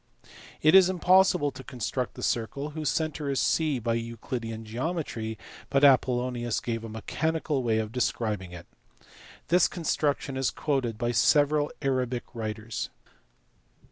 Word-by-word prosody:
It 155 +2 +6
is 190 -1 +8
impossible 180 -4 +4
to 130 0 -10
construct 125 0 -3
the - - -7
circle 140 +6 -2
whose 155 -2 -2
centre 150 +2 -2
is 135 - 0
C 155 -4 +2
by 115 -1 -1
Euclidean 115 -1 -4
geometry, 115 -3 -3 0.3
but 135 0 +2
Apollonius 125 -3 +3
gave 115 -1 -3
a 115 - -6
mechanical 150 +6 -2
way 115 -3 +1
of 110 -1 -2
describing 110 -6 -1
it. 85 -1 -9 0.8
This 180 0 +5
construction 145 -5 -1
is 135 -1 +1
quoted 130 -7 -1
by 120 0 0
several 145 +4 +3
Arabic 130 -2 0
writers. 110 -1 -4
125 Hz, 135 wpm, -27 LUFS, 115-150 Hz, 0.8 s, is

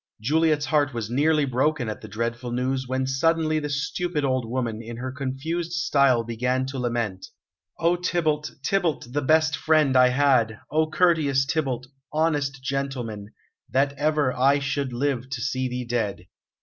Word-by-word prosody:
Juliet's 150 +5 +2
heart 145 -4 +1
was 115 -1 -4
nearly 150 +3 +3
broken 130 0 0
at 110 - -5
the 110 - -9
dreadful 115 +3 -3
news, 130 +1 -1
when 130 +1 -1
suddenly 155 +3 +1
the 150 -1 -4
stupid 150 +2 -1
old 130 -3 -1
woman, 115 -3 -2
in 115 0 -8
her 130 +2 -4
confused 140 +6 -3
style 140 -7 +3
began 125 +3 -1
to 135 0 -5
lament: 115 -6 -2 0.5
"O 170 +1 +2
Tybalt, 160 -4 0
Tybalt, 165 -9 0
the 145 - 0
best 155 +1 +3
friend 155 -4 +2
I 125 0 +7
had! 125 -4 +2
O 155 +1 +2
courteous 155 -6 +3
Tybalt! 135 -5 -1 0.3
Honest 145 -4 0
gentleman! 130 -7 -3 0.4
That 135 +4 +2
ever 145 -2 +1
I 135 +3 +3
should 140 -1 -2
live 130 0 -1
to 135 - -4
see 130 -2 -1
thee 125 0 -4
dead!" 110 -6 -2
135 Hz, 160 wpm, -25 LUFS, 125-150 Hz, 0.5 s, I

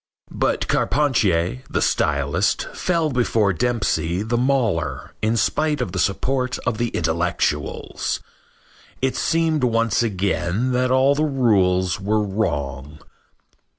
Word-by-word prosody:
But - - 0
Carpentier, 95 - +1
the - - -1
stylist, 70 +6 +1
fell 165 -4 0
before 115 -5 +1
Dempsey, 95 -5 0
the 115 +2 -1
mauler, 120 -9 0
in 110 +1 +1
spite 150 +7 +1
of 125 - -2
the 95 - -3
support 125 +7 0
of 110 - -1
the 120 - +1
intellectuals. 80 -6 -1 0.8
It 130 0 0
seemed 160 -3 +1
once 115 -2 +2
again 100 +1 -1
that 125 0 +1
all 130 +2 +4
the 150 +2 0
rules 95 - +2
were 105 +2 0
wrong. 75 -8 -3
110 Hz, 120 wpm, -22 LUFS, 90-130 Hz, 0.8 s, all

